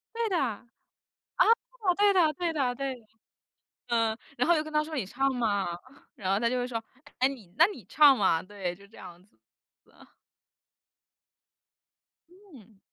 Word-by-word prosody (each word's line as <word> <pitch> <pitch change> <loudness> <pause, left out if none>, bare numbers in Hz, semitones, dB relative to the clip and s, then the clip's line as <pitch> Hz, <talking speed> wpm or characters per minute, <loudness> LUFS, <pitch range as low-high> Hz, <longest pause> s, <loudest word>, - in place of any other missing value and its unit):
对 460 -2 -1
的 365 - +1
啊， 235 -3 -3 1.3
对 410 -1 +5
的 335 -5 +3
对 340 +1 -2
的 260 -5 0
对 270 0 -3
的。 220 - -23 0.8
嗯， 225 -1 +1 0.2
然 - - +1
后 345 - +6
又 305 - 0
跟 310 0 -10
他 300 0 +2
说 310 0 -7
你 235 -9 -2
唱 270 +6 -1
嘛， 210 -5 0 0.5
然 190 -1 -1
后 200 - +1
他 235 +1 +1
就 250 - -1
会 245 0 -2
说： 230 -2 -4 0.4
“唉， 260 - +4
你 220 -10 -9
那 330 - +7
你 250 - -10
唱 280 +4 +6
嘛。” 165 -5 +2
对， 185 -3 -5
就 200 +2 -17
这 220 - -19
样 180 -1 -12
子 195 - -32 0.5
子 - - -28
啊。 - - -21 2.2
嗯。 280 - -18
245 Hz, 180 characters per minute, -28 LUFS, 205-305 Hz, 2.2 s, 那